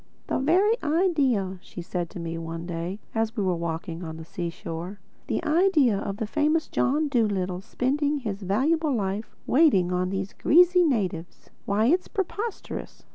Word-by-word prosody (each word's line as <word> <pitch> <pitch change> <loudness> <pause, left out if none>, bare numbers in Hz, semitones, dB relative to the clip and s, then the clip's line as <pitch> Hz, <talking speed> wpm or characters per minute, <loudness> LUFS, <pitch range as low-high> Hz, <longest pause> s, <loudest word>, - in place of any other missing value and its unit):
"The - - -1
very 385 - +3
idea," 280 - +1
she 175 - -9
said 175 -1 -3
to - - -8
me 165 0 -4
one 165 0 -5
day 175 +3 -4
as 225 +1 -1
we 205 - +1
were 185 -2 +1
walking 170 0 -4
on 160 -1 -6
the 160 - -9
seashore—"the 175 +3 -6
idea 310 - +4
of 200 -1 -4
the 220 - -2
famous 305 +6 +1
John 295 +4 +1
Dolittle 200 -8 0
spending 285 +7 0
his 215 -7 -4
valuable 280 - +1
life 200 0 -3
waiting 250 - +4
on 180 0 0
these 195 0 -3
greasy 355 +2 +5
natives!—Why, 200 - -2
it's 350 +9 +2
preposterous!" 405 +3 -5
210 Hz, 150 wpm, -26 LUFS, 180-300 Hz, -, greasy